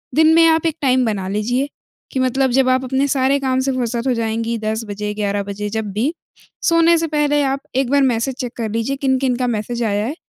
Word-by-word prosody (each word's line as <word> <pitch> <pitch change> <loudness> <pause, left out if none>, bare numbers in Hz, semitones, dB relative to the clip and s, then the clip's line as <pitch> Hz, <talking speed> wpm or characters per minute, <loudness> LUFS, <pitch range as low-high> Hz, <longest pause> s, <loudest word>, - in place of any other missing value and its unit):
दिन 315 +1 +5
में 330 - +6
आप 320 0 +2
एक 325 -1 0
टाइम 260 -2 +3
बना 200 -4 -2
लीजिए, 240 +7 -1 0.4
कि 265 - -2
मतलब 260 0 +1
जब 260 +1 +3
आप 255 0 +2
अपने 265 +2 0
सारे 270 0 +2
काम 260 -1 0
से 270 - +1
फुर्सत 240 0 -2
हो 255 - +3
जाएँगी, 230 0 -2
10 220 +1 -2
बजे, 210 +1 -4
11 205 -1 -1
बजे 205 +1 -5
जब 220 -1 -3
भी, 245 - 0 0.5
सोने 335 0 +4
से 330 - -1
पहले 295 -1 +1
आप 270 0 0 0.2
एक 265 -1 +1
बार 285 0 +4
मैसेज 250 0 0
चेक 245 -2 -5
कर 225 -2 -2
लीजिए, 230 +5 -1
किन-किन 265 -2 +1
का 250 -1 -1
मैसेज 235 +1 -2
आया 205 -1 0
है, 275 +6 -3
255 Hz, 230 wpm, -19 LUFS, 220-275 Hz, 0.5 s, में